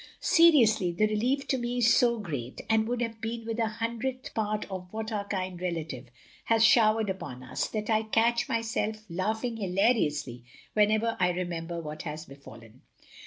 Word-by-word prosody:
Seriously, 235 - +5
the 175 +5 +2
relief 245 +6 0
to 265 - +1
me 240 +1 -2
is 235 -2 +5
so 235 -1 +3
great 145 - -5
— - - -29
and 220 0 +3
would 245 0 -1
have 225 -2 -5
been 230 0 -4
with 225 0 -3
a 225 - +2
hundredth 235 +4 -4
part 215 -1 -1
of 180 -1 -6
what 220 0 -4
our 205 -2 -3
kind 185 -3 -3
relative 160 -8 -4 0.4
has 225 0 +4
showered 220 -1 +4
upon 130 -10 -5
us 130 0 -2
that 215 -1 -4
I 220 -1 +2
catch 230 +2 +1
myself 225 -1 -1 0.2
Lmghing 220 +6 -2
hilariously 180 - 0 0.3
whenever 215 +2 +2
I 180 -1 +3
remember 175 -1 -3
what 155 -1 -6
has 155 0 -6
befallen. 120 -4 -14
215 Hz, 170 wpm, -28 LUFS, 175-230 Hz, 0.4 s, Seriously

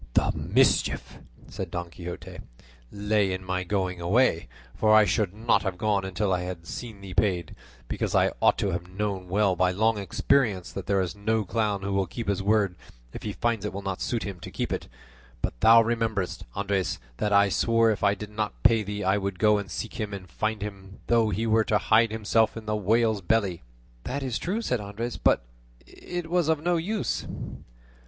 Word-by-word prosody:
"The - - +3
mischief," - - +1 0.3
said 95 - -6
Don 85 0 -5
Quixote, 90 0 -8 0.5
"lay 105 -1 +1
in 95 0 -5
my 95 0 -1
going 90 -2 -2
away; 90 - +2 0.3
for 110 0 +4
I 110 -1 +7
should 105 -3 +1
not 110 +4 +2
have 95 -3 -3
gone 100 -1 +1
until 95 +1 0
I 90 - 0
had 90 -2 -6
seen 110 +1 -7
thee 95 -2 -8
paid; 90 -4 0 0.3
because - - -2
I - - +4
ought - - +4
to 100 - 0
have 90 0 -4
known 95 -1 -3
well 100 0 +2
by 90 +1 +3
long 110 +4 +1
experience 100 +1 +1
that 95 - -6
there 100 -1 +2
is 90 +1 -3
no 110 +1 0
clown 105 -1 -1
who 100 0 -2
will 95 -1 +1
keep 115 +4 -5
his 100 -1 0
word 100 -2 +2 0.4
if - - -7
he 105 - -3
finds 115 0 -1
it 105 - -2
will 100 +1 -5
not 95 -1 -3
suit 120 -2 -1
him 100 -3 -6
to - - -8
keep - - -3
it; - - -4 0.5
but - - -4
thou 115 0 +8
rememberest, 110 -5 -1
Andres, 100 -2 -1 0.2
that 105 - -1
I 100 0 +5
swore 115 +3 +3
if 105 - -2
he 100 0 +3
did 105 +1 -8
not 105 0 -4
pay 115 -1 +5
thee 105 0 -4
I 95 +2 +2
would 100 -1 -3
go 105 +1 +4
and 100 -2 -6
seek 110 - -5
him, 105 -2 -3
and 95 -2 -9
find 110 +3 -2
him 100 -2 -8
though 115 -2 +3
he 110 +2 -1
were 110 0 +3
to 105 - +2
hide 115 +2 +4
himself 110 +1 +1
in 110 - -7
the 105 0 -1
whale's 110 +1 +2
belly." 95 -2 +1 0.4
"That 140 +2 -3
is 125 -4 -2
true," 210 +7 -2
said 125 - 0
Andres; 110 +4 -5
"but - - +3 0.4
it 175 -2 -6
was 170 -1 +1
of 160 -2 +2
no 175 +2 +1
use." 200 +5 -2
105 Hz, 205 wpm, -26 LUFS, 95-110 Hz, 0.5 s, thou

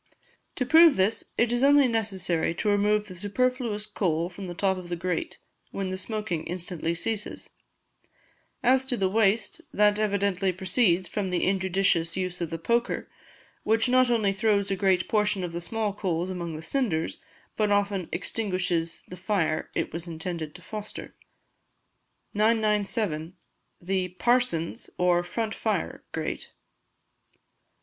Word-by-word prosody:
To 255 - -1
prove 320 +3 +7
this 195 +4 +1
it 235 0 +3
is 240 0 +1
only 280 0 +6
necessary 190 -8 0
to 210 - 0
remove 205 +1 +2
the 185 -3 -10
superfluous 215 +2 -1
coal 175 -5 -1
from 190 +1 -8
the 175 - -6
top 190 +1 +1
of 175 -1 -10
the 175 - -1
grate, 175 0 -3 0.3
when 195 -1 -3
the - - -2
smoking 210 -4 -3
instantly 175 -2 -2
ceases; 210 +4 -3 1.1
as 260 +2 +4
to 250 -2 0
the 190 - +2
waste, 220 - +2
that 210 -3 +3
evidently 200 -3 +1
proceeds 185 0 +2
from 200 -3 -2
the 180 -1 0
injudicious 190 -3 +1
use 185 -1 -3
of 170 - -2
the 165 - -3
poker, 235 +8 -1 0.5
which 225 +3 +2
not 255 0 +4
only 215 -5 +2
throws 200 -1 +1
a - - +2
great 185 -1 +2
portion 210 -3 +1
of 175 - -3
the 170 +1 -4
small 215 +3 -1
coals 180 -3 -2
among 170 -3 -4
the 155 - -7
cinders, 170 - -1 0.4
but 215 -1 +1
often 200 -3 +1
extinguishes 180 -6 -2
the 180 - -8
fire 180 -5 0
it - - -2
was 165 +1 -4
intended 165 -2 -5
to 180 - -12
foster. 210 +3 -7 1.2
997. 210 -6 +1 0.4
The 185 +1 -1
"Parson's" 180 -3 0
or 180 -1 +3
Front 220 +5 -3
Fire - - -2
Grate. - - -4
195 Hz, 145 wpm, -27 LUFS, 175-215 Hz, 1.2 s, prove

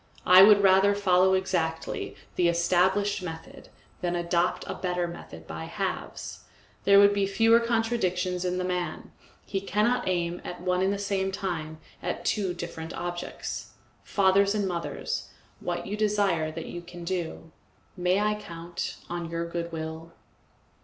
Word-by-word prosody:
I 185 +1 +9
would 205 0 +8
rather 195 +1 +5
follow 190 -1 +4
exactly 170 -4 -2 0.2
the 175 - +3
established 185 +4 +2
method 160 -3 -8 0.3
than 175 -1 -1
adopt 175 0 0
a - - -4
better 180 -1 -1
method 80 - -10
by 80 0 -6
halves. - - -5 0.4
There 200 0 +7
would 200 0 +7
be 200 -1 +1
fewer 225 +3 +5
contradictions 225 -6 0
in 180 0 -1
the 185 - -1
man; 180 -1 -3 0.3
he 195 - -2
cannot 210 +5 +1
aim 175 -1 -1
at 180 - -6
one 180 +1 0
and 190 +1 +2
the 200 - -1
same 195 -1 -1
time 170 -5 -4 0.2
at - - -4
two 200 -4 +1
different 165 -1 -6
objects. 175 0 -5 0.3
Fathers 200 +1 +3
and 205 -2 0
mothers, 170 -2 -3 0.3
what 175 -1 -3
you 200 - -3
desire 200 -7 +1
that - - -6
you 175 - -6
can 175 0 -10
do. 170 -2 -4 0.4
May 180 +1 +2
I 210 0 +2
count 170 -1 -5
on 175 -1 -4
your 170 0 -2
goodwill? 165 -1 -5
180 Hz, 150 wpm, -27 LUFS, 170-200 Hz, 0.4 s, I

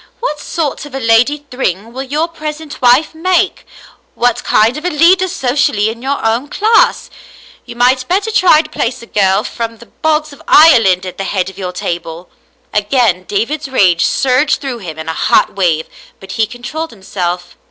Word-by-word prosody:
What 380 -12 -3
sort 300 -2 -3
of 275 - -11
a - - -2
Lady 245 +5 +2
Thryng 225 -3 -3
will 260 - -5
your 295 +5 -1
present 310 -2 -7
wife 255 +6 +4
make? 370 +3 0 0.5
What 245 0 0
kind 225 +4 +3
of 300 - -6
a 360 - 0
leader 360 +4 +4
socially 250 - 0
in 230 +1 -7
your 275 -1 -2
own 230 +5 0
class? 435 +8 +2 0.6
You 240 - -9
might 255 +1 +2
better 400 +4 0
try 345 -6 +4
to 305 - -12
place 250 -2 -3
a - - -10
girl 195 -3 +1
from 230 -1 -5
the 235 - -14
bogs 310 +2 -1
of - - -15
Ireland 225 - +5
at 185 - -8
the - - -2
head 190 -1 -2
of 190 - -15
your 180 -2 -4
table." 170 -1 -5 0.4
Again 210 -3 +1
David's 255 +11 -2
rage 185 -9 +3
surged 270 +3 +1
through 265 -4 -5
him 165 -6 -8
in 160 0 -7
a 160 - -2
hot - - +2
wave, 170 -5 0 0.3
but 195 - -11
he 220 -1 0
controlled 270 +8 -6
himself. 180 -3 -5
245 Hz, 185 wpm, -14 LUFS, 195-300 Hz, 0.6 s, Ireland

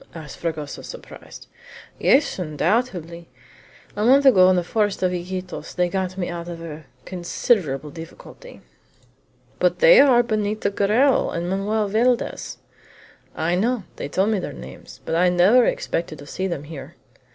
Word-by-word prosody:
asked 155 -4 -9
Fragoso, 155 -3 -4
surprised. - - -11 0.5
"Yes, 275 -6 +3
undoubtedly! 170 0 -2 0.7
A 210 - -2
month 270 +4 +5
ago, 185 -9 +7
in 185 - +4
the 180 - +1
forest 205 +1 -1
of 180 - +2
Iquitos, 180 +1 -6
they 180 -1 +1
got 185 0 -3
me 180 - -2
out 170 -1 -6
of 170 -1 -7
a 160 -2 -9 0.2
considerable 175 - -1
difficulty." 170 - -12 1.0
"But - - +2
they - - +7
are 250 -4 +6
Benito 215 -2 -1
Garral 220 +8 +2
and 170 +1 -3
Manoel 205 +3 -1
Valdez." 235 +4 0 0.8
"I 165 +2 -1
know. 225 +4 0
They - - -5
told 195 +7 +1
me 210 - +1
their - - -6
names, 65 +2 -12
but - - -3
I 180 +2 +3
never 190 +8 +5
expected 165 -2 -2
to 145 - -12
see 185 +6 -3
them 170 -6 -4
here." 150 -2 -10
185 Hz, 150 wpm, -22 LUFS, 170-220 Hz, 1.0 s, ago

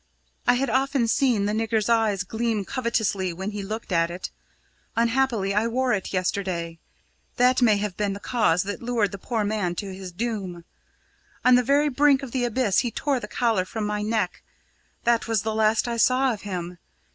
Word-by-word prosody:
I - - +5
had 260 -1 0
often 265 -1 +1
seen 230 -4 +2
the 210 - 0
nigger's 220 -1 0
eyes 220 -5 +2
gleam 220 0 -2
covetously 220 -7 -1
when 190 +4 -4
he 205 -1 -5
looked 215 +2 -6
at 165 -1 +2
it. 175 +2 -6 0.6
Unhappily, 230 -4 +1
I 210 +3 +2
wore 255 +2 +1
it 200 - -2
yesterday. 180 -3 -2 0.6
That 250 +1 +3
may 220 -4 +5
have 200 -2 -3
been 205 -2 0
the 200 - -7
cause 205 -8 +1
that 205 +1 -5
lured 235 -5 0
the 200 - -7
poor 225 +1 -2
man 205 -4 -1
to 195 +1 -5
his 185 -1 -8
doom. 190 -4 -4 0.8
On 255 - +7
the 250 - +6
very 285 +4 +2
brink 280 0 +3
of 260 - -6
the 250 -1 0
abyss 235 -4 +1
he 245 - 0
tore 275 +3 -1
the 210 - -7
collar 225 -4 +1
from 210 +3 -4
my 210 0 -2
neck 210 -4 -1 0.6
that 235 -1 +2
was 225 -3 +1
the 220 0 -1
last 220 +1 +2
I 235 -1 -2
saw 255 +2 +3
of 210 - -8
him. 180 -3 -5
220 Hz, 195 wpm, -25 LUFS, 195-240 Hz, 0.8 s, On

